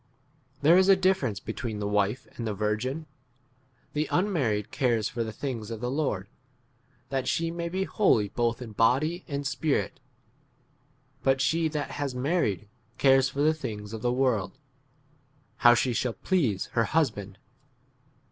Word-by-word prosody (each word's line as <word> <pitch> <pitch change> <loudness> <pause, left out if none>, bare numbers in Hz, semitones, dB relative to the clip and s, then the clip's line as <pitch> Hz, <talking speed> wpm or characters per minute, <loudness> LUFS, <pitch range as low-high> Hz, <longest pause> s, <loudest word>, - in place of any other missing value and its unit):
There 165 +5 +7
is 190 +1 +4
a 195 - +8
difference 185 - +1
between 110 0 -5
the 105 0 -2
wife 105 +5 0
and 115 - -4
the 105 - -2
virgin. 110 +9 -2 0.9
The 150 +1 0
unmarried 135 - 0
cares 120 -5 +1
for 120 -2 -3
the 110 - -5
things 115 -2 -5
of 115 -2 -5
the 125 +2 -2
Lord, 130 -10 -1 0.8
that 135 -2 -2
she 165 0 0
may 170 0 -3
be 190 +2 -1
holy 185 - +2
both 120 +2 -1
in 115 - -9
body 135 - +2
and 140 -2 -3
spirit; 140 +2 -1 1.2
but 135 0 +2
she 160 +4 +2
that 150 -2 -3
has 140 -3 -2
mar 150 +8 +1
ried 100 0 -1 0.3
cares 135 -1 +5
for 140 +2 -3
the 155 +1 +4
things 110 -8 -6
of 110 - -5
the 120 - +1
world, 125 -6 0 1.0
how 120 0 +7
she 125 0 +1
shall 120 0 -1
please 130 - 0
her 115 - +2
35 115 - -2
husband. 105 -11 0
130 Hz, 160 wpm, -27 LUFS, 110-155 Hz, 1.2 s, a